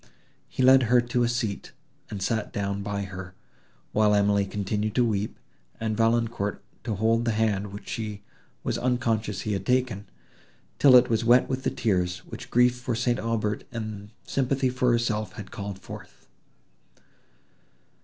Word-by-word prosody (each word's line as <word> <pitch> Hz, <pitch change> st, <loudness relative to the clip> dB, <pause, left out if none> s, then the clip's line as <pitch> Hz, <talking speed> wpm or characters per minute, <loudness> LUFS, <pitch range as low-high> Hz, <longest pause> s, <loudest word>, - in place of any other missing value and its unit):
He 130 Hz, -, -1 dB
led 130 Hz, +1 st, +7 dB
her 125 Hz, 0 st, +6 dB
to 120 Hz, 0 st, 0 dB
a 120 Hz, -, +2 dB
seat, 120 Hz, -5 st, -3 dB, 0.4 s
and 100 Hz, -2 st, -4 dB
sat 110 Hz, -3 st, -1 dB
down 100 Hz, 0 st, -2 dB
by 100 Hz, 0 st, -3 dB
her, 90 Hz, -1 st, -8 dB, 0.6 s
while 105 Hz, -1 st, +3 dB
Emily 100 Hz, -1 st, +3 dB
continued 105 Hz, +2 st, -2 dB
to 125 Hz, -, +4 dB
weep, 105 Hz, -2 st, -1 dB, 0.4 s
and 110 Hz, -1 st, -1 dB
Valancourt 115 Hz, -2 st, 0 dB, 0.2 s
to 110 Hz, -4 st, -1 dB
hold 115 Hz, +3 st, +2 dB
the 115 Hz, -2 st, 0 dB
hand, 105 Hz, -2 st, +1 dB
which 100 Hz, +2 st, -9 dB
she 105 Hz, -2 st, -5 dB, 0.4 s
was -, -, -1 dB
unconscious 115 Hz, -5 st, 0 dB
he 105 Hz, -, -2 dB
had 95 Hz, -1 st, -2 dB
taken, 125 Hz, -3 st, 0 dB, 0.7 s
till 135 Hz, -3 st, +7 dB
it 125 Hz, 0 st, +7 dB
was 115 Hz, 0 st, +2 dB
wet 120 Hz, +2 st, +5 dB
with 130 Hz, 0 st, -2 dB
the -, -, 0 dB
tears, 90 Hz, -5 st, -1 dB
which -, -, -9 dB
grief 125 Hz, 0 st, +3 dB
for 125 Hz, -1 st, -2 dB
St. 120 Hz, +1 st, 0 dB
Aubert 110 Hz, -2 st, -1 dB
and 110 Hz, -3 st, -6 dB, 0.2 s
sympathy 135 Hz, 0 st, 0 dB
for 125 Hz, -1 st, +1 dB
herself 110 Hz, -4 st, 0 dB
had 100 Hz, -, -9 dB
called 100 Hz, -1 st, -5 dB
forth. -, -, -11 dB
110 Hz, 160 wpm, -26 LUFS, 100-120 Hz, 0.7 s, led